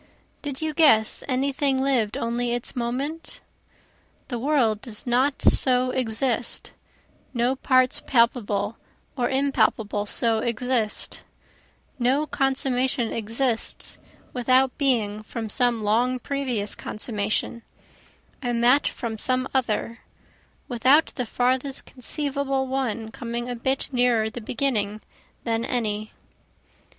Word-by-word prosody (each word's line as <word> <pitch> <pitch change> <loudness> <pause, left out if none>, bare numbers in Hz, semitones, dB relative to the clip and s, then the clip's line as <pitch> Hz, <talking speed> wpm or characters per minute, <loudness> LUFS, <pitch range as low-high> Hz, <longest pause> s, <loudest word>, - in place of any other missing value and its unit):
Did 285 0 -5
you 310 -1 -1
guess 255 -10 +4
any 270 +1 0
thing 270 -1 +1
lived 255 -6 +1
only 235 +1 -1
its 240 0 -4
moment? 265 +7 -4 0.9
The 240 -3 -3
world 235 -6 +1
does 220 -4 -5
not 255 +3 +1
so 255 -1 +3
exist, 240 -1 0 0.6
no 240 +2 +1
parts 255 -1 +2
palpable 230 -3 +1 0.4
or 245 -3 0
impalpable 225 -6 +1
so 225 +1 +1
exist, 235 -1 0 0.8
No 260 +5 +2
consummation 265 -4 0
exists 230 +2 0 0.3
without 255 +1 +2
being 220 -7 +1
from 220 +1 -6
some 240 -1 +3
long 240 +5 +2
previous 250 -6 -2
consummation, 215 +1 -2 0.8
and 240 -2 -1
that 255 +4 +5
from 225 -3 -4
some 255 +2 +3
other, 230 -2 -1 0.7
Without 265 +5 +3
the 250 -3 -4
farthest 255 +3 0
conceivable 275 0 -2
one 250 -4 -3
coming 235 +1 -5
a 245 - -3
bit 265 +3 +1
nearer 245 -4 +2
the 240 - -7
beginning 215 -4 -1 0.4
than 230 -1 -1
any. 215 -3 -2
245 Hz, 110 wpm, -24 LUFS, 225-265 Hz, 0.9 s, that